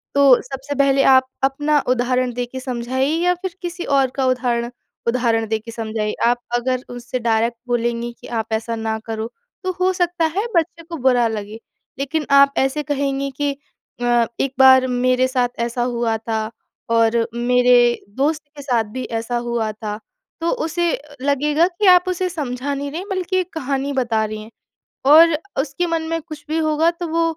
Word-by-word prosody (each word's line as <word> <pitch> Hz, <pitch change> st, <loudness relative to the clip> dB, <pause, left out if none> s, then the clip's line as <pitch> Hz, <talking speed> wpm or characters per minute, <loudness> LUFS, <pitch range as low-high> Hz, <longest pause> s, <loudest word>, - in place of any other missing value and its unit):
तो 280 Hz, -, +5 dB, 0.2 s
सबसे 270 Hz, +2 st, -6 dB
पहले 275 Hz, 0 st, +3 dB
आप 260 Hz, 0 st, +5 dB, 0.2 s
अपना 290 Hz, +2 st, +2 dB
उदाहरण 250 Hz, 0 st, +1 dB
देके 245 Hz, +2 st, -4 dB
समझाइए 260 Hz, +2 st, -1 dB
या 360 Hz, 0 st, +4 dB
फिर 375 Hz, -3 st, -4 dB
किसी 350 Hz, 0 st, -5 dB
और 275 Hz, -3 st, +2 dB
का 270 Hz, -, 0 dB
उदाहरण 245 Hz, -2 st, 0 dB, 0.4 s
उदाहरण 235 Hz, -2 st, +1 dB
देके 220 Hz, +1 st, -3 dB
समझाइए। 220 Hz, -2 st, -3 dB
आप 240 Hz, +1 st, +3 dB, 0.2 s
अगर 255 Hz, +1 st, -1 dB
उससे 245 Hz, +1 st, -5 dB
डायरेक्ट 230 Hz, 0 st, +1 dB
बोलेंगी 240 Hz, 0 st, -1 dB
कि -, -, -10 dB
आप 220 Hz, -, -7 dB
ऐसा 225 Hz, +1 st, -1 dB
ना 220 Hz, 0 st, -2 dB
करो 225 Hz, 0 st, -3 dB, 0.4 s
तो 370 Hz, -, 0 dB
हो 370 Hz, +1 st, +3 dB
सकता 355 Hz, -2 st, 0 dB
है 410 Hz, -, +1 dB
बच्चे 335 Hz, 0 st, 0 dB
को 335 Hz, 0 st, -7 dB
बुरा 245 Hz, -2 st, +4 dB
लगे। 215 Hz, 0 st, -5 dB, 0.4 s
लेकिन 295 Hz, +3 st, -1 dB
आप 280 Hz, 0 st, +5 dB
ऐसे 270 Hz, +3 st, +1 dB
कहेंगी 275 Hz, -1 st, -1 dB
कि 290 Hz, -1 st, +2 dB, 0.5 s
अ, 240 Hz, -1 st, +3 dB
एक 270 Hz, -1 st, 0 dB
बार 260 Hz, -1 st, +7 dB
मेरे 255 Hz, +1 st, +2 dB
साथ 250 Hz, -2 st, +1 dB
ऐसा 235 Hz, +1 st, -1 dB
हुआ 235 Hz, -2 st, 0 dB
था 220 Hz, -1 st, -2 dB, 0.4 s
और 230 Hz, 0 st, +3 dB
मेरे 245 Hz, 0 st, +4 dB
दोस्त 290 Hz, +8 st, 0 dB, 0.2 s
के -, -, -7 dB
साथ 245 Hz, -5 st, +1 dB
भी 255 Hz, -, -4 dB, 0.2 s
ऐसा 240 Hz, +1 st, -2 dB
हुआ 225 Hz, -2 st, -1 dB
था 210 Hz, -1 st, -6 dB, 0.4 s
तो 335 Hz, -, +1 dB, 0.2 s
उसे 340 Hz, +2 st, -1 dB, 0.4 s
लगेगा 290 Hz, +3 st, +2 dB
कि 370 Hz, +3 st, -3 dB
आप 360 Hz, -1 st, +7 dB
उसे 365 Hz, 0 st, -1 dB
समझा 285 Hz, -4 st, -3 dB
नहीं 280 Hz, +1 st, -4 dB
रहीं 335 Hz, +5 st, -4 dB
बल्कि 370 Hz, -1 st, -1 dB
एक 365 Hz, -1 st, -1 dB
कहानी 280 Hz, -2 st, -2 dB
बता 235 Hz, -5 st, +1 dB
रही 215 Hz, 0 st, -5 dB
हैं। 220 Hz, -, -14 dB, 0.6 s
और 330 Hz, +2 st, +8 dB, 0.3 s
उसके 285 Hz, +5 st, -3 dB
मन 330 Hz, -1 st, 0 dB
में 330 Hz, 0 st, -1 dB
कुछ 310 Hz, -2 st, -10 dB
भी 315 Hz, -, 0 dB
होगा 315 Hz, +1 st, +2 dB
तो 345 Hz, 0 st, -6 dB
वो 330 Hz, +1 st, +1 dB
260 Hz, 180 wpm, -20 LUFS, 235-300 Hz, 0.6 s, और